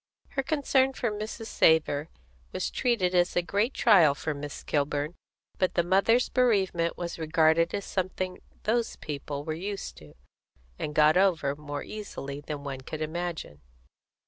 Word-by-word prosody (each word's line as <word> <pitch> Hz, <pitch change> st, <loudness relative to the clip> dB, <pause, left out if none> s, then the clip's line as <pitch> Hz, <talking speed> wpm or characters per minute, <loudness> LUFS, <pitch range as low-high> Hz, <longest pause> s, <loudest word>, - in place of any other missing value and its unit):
Her 270 Hz, -, -1 dB
concern 270 Hz, -2 st, +2 dB
for 240 Hz, -4 st, -1 dB
Mrs. 215 Hz, +2 st, -5 dB
Savor 160 Hz, -6 st, +3 dB, 0.4 s
was -, -, -2 dB
treated 215 Hz, -8 st, +1 dB
as 175 Hz, 0 st, +2 dB
a 175 Hz, -, +2 dB
great 205 Hz, +7 st, +1 dB
trial 170 Hz, -10 st, +6 dB
for 155 Hz, +2 st, -3 dB
Miss 145 Hz, 0 st, -7 dB
Kilburn; 145 Hz, +1 st, -1 dB, 0.5 s
but 185 Hz, -, +1 dB
the 175 Hz, -, +3 dB
mother's 195 Hz, +7 st, +3 dB
bereavement 190 Hz, -9 st, +1 dB
was 170 Hz, -1 st, -5 dB
regarded 160 Hz, +1 st, +3 dB
as 200 Hz, -, -4 dB
something 185 Hz, -1 st, -3 dB, 0.2 s
those 230 Hz, +1 st, 0 dB
people 145 Hz, -1 st, -5 dB
were 155 Hz, -, -3 dB
used 195 Hz, +5 st, -5 dB
to, 75 Hz, -1 st, -15 dB, 0.6 s
and 150 Hz, -, -4 dB
got 155 Hz, +2 st, +5 dB
over 170 Hz, -7 st, +2 dB
more 145 Hz, -1 st, -6 dB
easily 145 Hz, -10 st, -7 dB
than 145 Hz, -1 st, -6 dB
one 135 Hz, -2 st, -5 dB
could 155 Hz, +4 st, -5 dB
imagine. 160 Hz, -, -4 dB
170 Hz, 150 wpm, -28 LUFS, 150-205 Hz, 0.6 s, trial